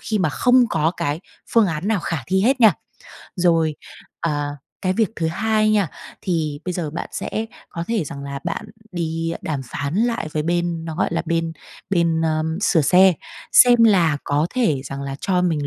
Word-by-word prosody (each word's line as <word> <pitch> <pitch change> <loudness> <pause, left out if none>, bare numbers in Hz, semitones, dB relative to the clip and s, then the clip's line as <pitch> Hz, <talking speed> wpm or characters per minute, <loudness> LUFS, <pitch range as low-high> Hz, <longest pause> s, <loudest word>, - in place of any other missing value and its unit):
khi 215 -2 -2
mà 180 - +2
không 250 - +4
có 160 0 +2
cái 145 +3 -2 0.3
phương 230 -3 +5
án 165 +2 -2
nào 220 -4 +1
khả 165 -2 -2
thi 190 +2 +2
hết 260 +3 +2
nha. 220 -4 +8 0.6
Rồi, 165 -3 +2 0.5
ờ, 145 -2 -2 0.3
cái 185 -1 +1
việc 220 0 +1
thứ 165 - -1
hai 215 +5 +1
nha, 205 -5 +2 0.3
thì 155 -5 -1
bây 180 - -2
giờ 170 -4 -3
bạn 160 - -5
sẽ 220 +1 -3 0.2
có 170 - -5
thể 225 -8 0
rằng 140 0 -7
là 140 0 -5
bạn 170 -1 -3 0.3
đi 165 -1 -2
đàm 150 -4 -2
phán 140 +5 -4
lại 230 -5 0
với 150 - -1
bên 170 0 -1
nó, 160 -1 -5
gọi - - +1
là, 165 - 0
bên, 165 -1 0
à, - - -26 0.3
bên 170 -3 +2 0.4
sửa 195 -6 +3
xe, 185 +6 +6 0.4
xem 240 -2 +7
là 175 -9 +4
có 145 +2 +1
thể 160 - +1
rằng 140 0 -6
là 135 0 -5
cho 180 -2 +1
mình 155 -5 0
170 Hz, 195 wpm, -21 LUFS, 155-200 Hz, 0.6 s, nha